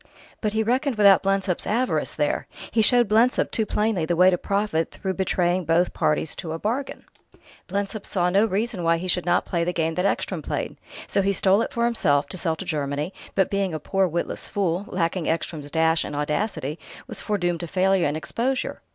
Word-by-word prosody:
But 210 -2 -1
he 220 0 +1
reckoned 255 +4 0
without 200 -3 +6
Blensop's 195 -2 0
avarice, 245 +4 0
there; - - -1 0.2
he 225 - +3
showed 240 +1 +4
Blensop 225 +5 +3
too 220 -2 0
plainly 210 -5 0
the 170 +2 0
way 180 +2 +6
to 180 - +1
profit 200 -5 0
through 190 -2 -4
betraying 185 -1 0
both 165 +2 +2
parties 150 +1 0
to 160 -2 -5
a - - -3
bargain; 235 +10 -3 0.6
Blensop 200 +2 -3
saw 180 -2 +1
no 200 +4 +4
reason 215 0 -1
why 165 0 +2
he 180 +2 -5
should 180 -1 +1
not 175 0 +2
play 170 -2 -1
the 180 +1 -1
game 165 -1 0
that 180 +3 -1
Ekstrom - - -2
played. - - -3 0.3
So - - +1
he 200 +1 +1
stole 195 +2 +3
it - - -2
for 235 0 0
himself, 145 -12 +2
to - - -5
sell 165 -3 0
to 195 - -7
Germany, 150 +2 -2 0.2
but 190 -2 +2
being 195 -4 0
a - - -3
poor, 195 +4 +1
witless 170 0 -3
fool, 190 -1 -1
lacking 175 -4 -1
Ekstrom's 160 -2 -3
dash 160 +1 +2
and 145 - -6
audacity, 150 0 -2 0.3
was - - -5
foredoomed 175 -5 -1
to 170 - -5
failure 185 0 +2
and 145 +2 -2
exposure." 255 +10 -2
185 Hz, 205 wpm, -24 LUFS, 165-210 Hz, 0.6 s, without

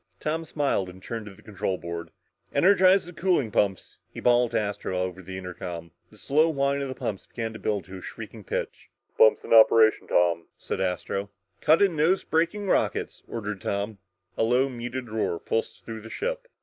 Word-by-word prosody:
Tom 160 +2 -2
smiled 140 -11 0
and 95 +1 -13
turned 115 -1 -5
to 100 - -10
the - - -19
control 95 -3 -2
board. 85 0 -6 0.5
"Energize 185 +4 +5
the 175 - -10
cooling 170 - +1
pumps!" 100 -3 0
he - - -8
bawled 120 0 +4
to - - +1
Astro 100 -3 -3
over 90 0 -2
the 95 +1 -7
intercom. 90 -2 -7 0.2
The - - -18
slow 155 +4 +3
whine 140 -2 +1
of 140 - -2
the 130 - -5
pumps 100 -5 -4
began 115 -2 -4
to 110 - -8
build 105 -3 -1
to 95 +3 -10
a - - -10
shrieking - - -9
pitch. - - -4 0.3
"Pumps 110 - +5
in - - -1
operation, 110 0 +6
Tom," 85 -1 +2
said - - -4
Astro. 95 +2 -2 0.3
"Cut 160 +6 +5
in 190 -4 +2
nose 160 +6 +3
braking 170 +6 0
rockets," 190 - 0
ordered 105 -4 -5
Tom. 100 +2 -3 0.4
A - - +4
low 125 +4 +3
muted 120 0 -5
roar 110 -6 -1
pulsed 115 +6 -3
through 110 -1 -6
the 115 - -10
ship. - - -3
110 Hz, 190 wpm, -26 LUFS, 95-145 Hz, 0.5 s, operation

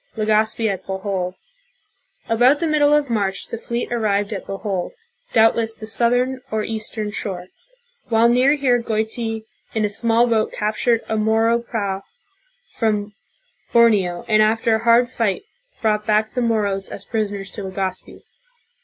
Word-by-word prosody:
Legazpi 220 +1 +1
at 195 -3 -2
Bo 190 0 -2
hol. 190 -2 -3 0.9
About 245 +6 +4
the 335 - 0
middle 300 -2 +3
of 295 -1 +3
March 200 -5 -2
the - - -4
fleet 235 +1 -3
arrived 205 -2 0
at 195 - -6
Bohol, 195 - -3 0.4
doubt 225 0 +5
less 225 -1 -1
the 215 - -9
southern 245 +3 +1
or 215 0 -1
eastern 215 -1 -4
shore. 185 -3 -4 0.6
AYhile 230 +1 +4
near 260 +3 +4
here 255 -4 +2
Goiti 225 0 -2 0.3
in 215 -1 +2
a 205 - -2
small 230 +2 +2
boat 225 -2 +1
captured 225 +2 0
a 220 - -1
Moro 225 +2 +2
prau 200 -5 -3 0.7
from 210 -2 -1 0.6
Borneo 205 -7 +3
and 215 -1 +4
after 225 +1 +2
a 220 +1 0
hard 235 +1 +5
fight 230 - -1 0.4
brought 210 -1 +1
back 215 0 +2
the 250 - -1
M 230 -1 +2
o - - +2
r 215 -1 +1
o 200 - 0
s 195 - -6
as 195 - -8
pris 215 -2 -1
oners 195 -2 -7
to 210 - -5
Legazpi. 190 -1 -5
220 Hz, 170 wpm, -21 LUFS, 205-235 Hz, 0.9 s, doubt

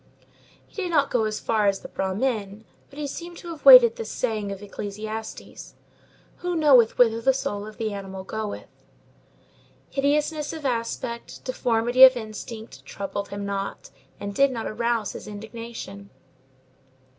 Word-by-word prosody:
He 415 - -7
did 360 - -2
not 290 -4 +2
go 230 -3 +2
as 215 0 -2
far 215 -2 +1
as 195 -1 +1
the - - -8
Brahmin, 205 +1 -2 0.2
but 280 - -16
he 300 - -3
seemed 340 +4 -7
to 345 - -9
have 325 -3 -8
weighed - - +12
this 460 - -5
saying 215 -5 -2
of 195 +1 -7
Ecclesiastes: 215 +2 -7 0.6
"Who 355 0 -3
knoweth 275 -8 +5
whither 230 -2 +4
the 265 +2 +3
soul 205 -5 -3
of 215 - -11
the 220 -2 -2
animal 195 -1 -7
goeth?" 215 +2 -5 1.3
Hideousness 295 +2 0
of 315 -3 -7
aspect, 235 -1 -3
deformity 245 0 +3
of 260 -1 +9
instinct, 220 0 -8
troubled 200 0 -5
him 200 0 -5
not, 200 0 -4 0.3
and 200 0 -5
did 275 +4 +4
not 230 -3 -4
arouse 230 -1 -1
his - - -9
indignation. 210 -1 -8
225 Hz, 150 wpm, -25 LUFS, 205-270 Hz, 1.3 s, weighed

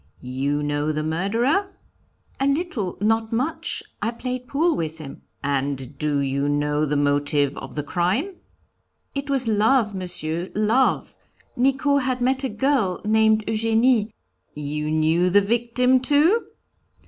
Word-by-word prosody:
'You 135 +3 -2
know 145 +1 -1
the 155 0 -2
murderer?' 230 - 0 0.6
'A 270 - +1
little, 280 - -1
not 225 +1 +1
much; 315 +8 -2 0.2
I - - 0
played 250 +1 -5
pool 320 +5 +1
with 160 -1 -3
him.' 150 -4 -10 0.2
'And 140 -1 -2
do 150 -2 0
you 140 +1 -1
know 145 +1 0
the 145 0 0
motive 145 0 +1
of - - -9
the 150 - -2
crime?' 185 - -1 0.8
'It 280 0 -4
was 265 -3 0
love, 220 +1 +2
Monsieur, 175 -2 -2
love; 220 +5 +1 0.4
Nicot 275 +3 +2
had 255 -1 -1
met 260 +2 +1
a 265 - 0
girl, 215 -4 0
named 220 0 +3
Eugénie 225 +1 +2 0.2
' - - -44
'You 150 +1 -3
knew 160 +3 +2
the 200 +3 +5
victim, 240 +4 +2
too?' 300 - +3
215 Hz, 140 wpm, -23 LUFS, -, 0.8 s, the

